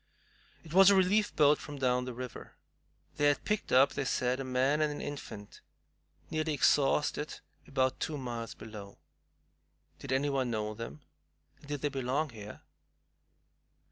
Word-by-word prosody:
It 160 Hz, -1 st, -11 dB
was 195 Hz, +1 st, +8 dB
a 200 Hz, -, +6 dB
relief 195 Hz, +3 st, +2 dB
boat 150 Hz, -1 st, +5 dB
from 145 Hz, -1 st, -8 dB
down 125 Hz, -1 st, +1 dB
the 125 Hz, -, -5 dB
river. 125 Hz, 0 st, -8 dB, 0.6 s
They 145 Hz, -, +2 dB
had 145 Hz, -, +2 dB
picked 210 Hz, -1 st, -1 dB
up, 130 Hz, +2 st, +5 dB
they 140 Hz, -, -2 dB
said, 125 Hz, 0 st, 0 dB
a -, -, -2 dB
man 130 Hz, +4 st, +1 dB
and 150 Hz, -1 st, +2 dB
an 145 Hz, -, -6 dB
infant, 110 Hz, -8 st, -8 dB, 0.7 s
nearly 155 Hz, -1 st, 0 dB
exhausted, 145 Hz, +2 st, +2 dB, 0.3 s
about 130 Hz, -1 st, 0 dB
two 155 Hz, -, -2 dB
miles 120 Hz, -4 st, -5 dB
below. 105 Hz, -3 st, -10 dB, 1.0 s
Did 135 Hz, -, -7 dB
anybody 135 Hz, -1 st, +1 dB
know 110 Hz, -2 st, -2 dB
them, 115 Hz, +7 st, -8 dB, 0.6 s
and 145 Hz, -, -17 dB
did 145 Hz, -2 st, -4 dB
they 145 Hz, -, 0 dB
belong 135 Hz, +2 st, -1 dB
here? 105 Hz, -2 st, -10 dB
135 Hz, 150 wpm, -31 LUFS, 125-150 Hz, 1.0 s, was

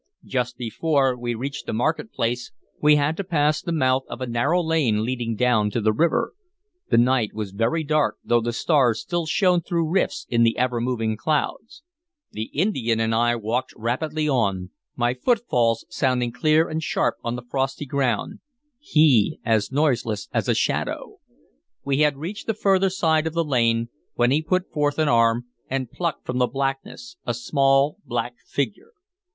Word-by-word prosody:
Just 125 Hz, -2 st, -2 dB
before 135 Hz, +2 st, +1 dB
we 120 Hz, -1 st, -3 dB
reached 135 Hz, +4 st, -5 dB
the -, -, -2 dB
market 155 Hz, -, -1 dB
place 120 Hz, +2 st, -2 dB, 0.3 s
we 150 Hz, 0 st, +6 dB
had 145 Hz, +2 st, +1 dB
to 200 Hz, -, -2 dB
pass 150 Hz, -4 st, +1 dB
the 170 Hz, -, -4 dB
mouth 130 Hz, -4 st, +2 dB
of -, -, -7 dB
a 130 Hz, -, -2 dB
narrow 125 Hz, +9 st, +1 dB
lane 135 Hz, -10 st, +1 dB
leading 120 Hz, -2 st, -2 dB
down 110 Hz, -3 st, +2 dB
to 110 Hz, -, -2 dB
the 110 Hz, -1 st, +2 dB
river. 230 Hz, -, +1 dB, 0.6 s
The -, -, +3 dB
night 120 Hz, -3 st, +2 dB
was 105 Hz, -3 st, -4 dB
very 115 Hz, +11 st, 0 dB
dark, 155 Hz, 0 st, +1 dB
though 120 Hz, 0 st, +2 dB
the 120 Hz, +1 st, -2 dB
stars 125 Hz, -2 st, +2 dB
still 170 Hz, +7 st, -3 dB
shone 180 Hz, +1 st, +3 dB
through 170 Hz, -1 st, -1 dB
rifts 190 Hz, -, 0 dB
in 115 Hz, -1 st, +1 dB
the 115 Hz, -1 st, +3 dB
ever 125 Hz, -1 st, 0 dB
moving 115 Hz, -3 st, -1 dB
clouds. 210 Hz, -, -2 dB, 0.5 s
The 110 Hz, -, -4 dB
Indian 130 Hz, -, 0 dB
and 115 Hz, 0 st, +1 dB
I 120 Hz, +1 st, +2 dB
walked 120 Hz, +3 st, -2 dB
rapidly 150 Hz, +7 st, -2 dB
on, 100 Hz, -9 st, 0 dB, 0.2 s
my 120 Hz, 0 st, +1 dB
footfalls 125 Hz, -, +1 dB
sounding 125 Hz, -3 st, 0 dB
clear 155 Hz, +6 st, +2 dB
and 160 Hz, 0 st, -3 dB
sharp -, -, 0 dB
on 120 Hz, 0 st, -2 dB
the 125 Hz, -, -7 dB
frosty 135 Hz, +2 st, -2 dB
ground, 130 Hz, -5 st, -1 dB, 0.4 s
he 150 Hz, -, +3 dB
as 110 Hz, -1 st, +1 dB
noiseless 125 Hz, -8 st, 0 dB
as -, -, 0 dB
a -, -, +3 dB
shadow. -, -, -2 dB, 0.7 s
We 140 Hz, 0 st, 0 dB
had 150 Hz, -2 st, +3 dB
reached 175 Hz, +9 st, -6 dB
the 225 Hz, -, 0 dB
further 195 Hz, -2 st, +3 dB
side 160 Hz, -4 st, +1 dB
of 160 Hz, -, -4 dB
the 170 Hz, 0 st, 0 dB
lane, 115 Hz, -4 st, +1 dB, 0.3 s
when 120 Hz, +1 st, +3 dB
he 150 Hz, +3 st, +3 dB
put 185 Hz, +3 st, -1 dB
forth 145 Hz, -2 st, 0 dB
an 155 Hz, -2 st, +2 dB
arm 115 Hz, 0 st, +3 dB, 0.2 s
and 130 Hz, -2 st, -3 dB
plucked 170 Hz, -4 st, -3 dB
from 125 Hz, 0 st, -2 dB
the 125 Hz, -, +3 dB
blackness 135 Hz, -2 st, -4 dB
a 120 Hz, -, -2 dB
small 135 Hz, -, +2 dB
black 120 Hz, 0 st, -3 dB
figure. 215 Hz, -, -4 dB
130 Hz, 175 wpm, -23 LUFS, 120-155 Hz, 0.7 s, we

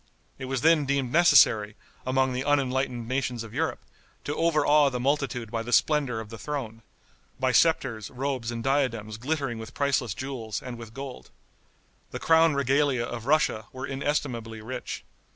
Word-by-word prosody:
It 130 Hz, -, -5 dB
was 130 Hz, -1 st, -2 dB
then 160 Hz, -1 st, +4 dB
deemed 135 Hz, -3 st, 0 dB
necessary, 120 Hz, -10 st, +5 dB, 0.3 s
among 130 Hz, 0 st, +2 dB
the 125 Hz, +1 st, -2 dB
unenlightened 130 Hz, -4 st, 0 dB
nations 125 Hz, -2 st, -2 dB
of 110 Hz, -, -11 dB
Europe, -, -, -1 dB, 0.4 s
to 145 Hz, -, -3 dB
overawe 150 Hz, -3 st, +4 dB
the 125 Hz, -2 st, -4 dB
multitude 135 Hz, -4 st, -1 dB
by 115 Hz, -1 st, -1 dB
the 120 Hz, +2 st, -6 dB
splendor 140 Hz, -4 st, +2 dB
of 110 Hz, -1 st, -8 dB
the 115 Hz, -1 st, -9 dB
throne 125 Hz, -7 st, -5 dB, 0.6 s
by 130 Hz, 0 st, +2 dB
scepters, 125 Hz, -6 st, +2 dB
robes 130 Hz, -3 st, -3 dB
and 115 Hz, -1 st, -4 dB
diadems 115 Hz, -6 st, 0 dB
glittering 135 Hz, -2 st, -2 dB
with 110 Hz, +3 st, -9 dB
priceless 135 Hz, -7 st, 0 dB
jewels 125 Hz, -5 st, -4 dB
and 125 Hz, -2 st, -8 dB
with 115 Hz, 0 st, -10 dB
gold. 135 Hz, -2 st, -8 dB, 0.8 s
The -, -, -6 dB
crown 160 Hz, -2 st, +4 dB
regalia 140 Hz, -2 st, +2 dB
of 120 Hz, 0 st, -6 dB
Russia 140 Hz, -8 st, +2 dB
were 130 Hz, +1 st, -6 dB
inestimably 135 Hz, -5 st, -2 dB
rich. 125 Hz, +3 st, -6 dB
130 Hz, 160 wpm, -27 LUFS, 115-140 Hz, 0.8 s, necessary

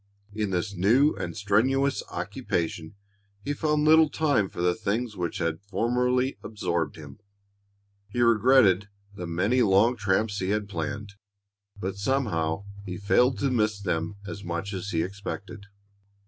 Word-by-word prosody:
In 105 Hz, -1 st, -1 dB
this 95 Hz, +3 st, -2 dB
new 115 Hz, -, +4 dB
and -, -, -5 dB
strenuous 130 Hz, +8 st, +2 dB
occupation 80 Hz, +1 st, -3 dB, 0.5 s
he 145 Hz, -, -1 dB
found 150 Hz, 0 st, 0 dB
little 160 Hz, 0 st, +6 dB
time 140 Hz, -11 st, +1 dB
for -, -, -10 dB
the 90 Hz, 0 st, +2 dB
things 110 Hz, +3 st, -2 dB
which 90 Hz, -3 st, -3 dB
had 80 Hz, -1 st, -2 dB
formally 125 Hz, +6 st, 0 dB
absorbed 90 Hz, -7 st, -2 dB
him. 75 Hz, 0 st, -11 dB, 0.9 s
He 120 Hz, +4 st, -2 dB
regretted 110 Hz, -4 st, +4 dB, 0.2 s
the 90 Hz, -3 st, -6 dB
many 100 Hz, +9 st, +1 dB
long 110 Hz, +3 st, +4 dB
tramps 105 Hz, 0 st, 0 dB
he 95 Hz, -, -2 dB
had 105 Hz, 0 st, 0 dB
planned, 100 Hz, +3 st, -4 dB, 0.7 s
but 95 Hz, +1 st, -4 dB
somehow 100 Hz, -8 st, -1 dB, 0.2 s
he 90 Hz, -2 st, -6 dB
failed 125 Hz, +4 st, +3 dB
to 135 Hz, -, +1 dB
miss 105 Hz, -4 st, +1 dB
them 90 Hz, -1 st, -2 dB
as 100 Hz, +1 st, -7 dB
much 85 Hz, +3 st, -4 dB
as 95 Hz, +1 st, -4 dB
he 80 Hz, -4 st, 0 dB
expected. 100 Hz, +1 st, -7 dB
100 Hz, 145 wpm, -26 LUFS, 90-120 Hz, 0.9 s, little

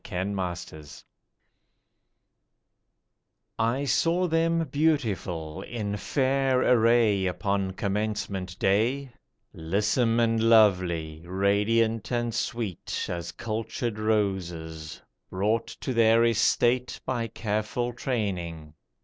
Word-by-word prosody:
THE -, -, -12 dB
GRADUATES 90 Hz, -6 st, -5 dB, 2.5 s
I 120 Hz, +5 st, +1 dB
SAW 170 Hz, +6 st, +2 dB
them 165 Hz, 0 st, +1 dB
beautiful, 105 Hz, -, -1 dB
in 105 Hz, -4 st, -4 dB
fair 135 Hz, +3 st, +1 dB
array 115 Hz, -5 st, +4 dB
upon 95 Hz, +1 st, -1 dB
Commencement 100 Hz, -2 st, -3 dB
Day; 125 Hz, +8 st, +1 dB, 0.4 s
Lissome 105 Hz, +7 st, +1 dB
and 115 Hz, -1 st, +2 dB
lovely, 90 Hz, -8 st, +3 dB
radiant 105 Hz, +4 st, +1 dB
and 120 Hz, -1 st, -1 dB
sweet 115 Hz, -5 st, -3 dB
As 85 Hz, -1 st, -4 dB
cultured 110 Hz, +2 st, -4 dB
roses, 90 Hz, -7 st, -2 dB, 0.3 s
brought 105 Hz, +5 st, 0 dB
to 130 Hz, -, -5 dB
their 115 Hz, 0 st, +5 dB
estate 120 Hz, +2 st, +2 dB
By 120 Hz, -3 st, -1 dB
careful 110 Hz, +3 st, -2 dB
training. 90 Hz, -, -3 dB
110 Hz, 90 wpm, -27 LUFS, 95-120 Hz, 2.5 s, their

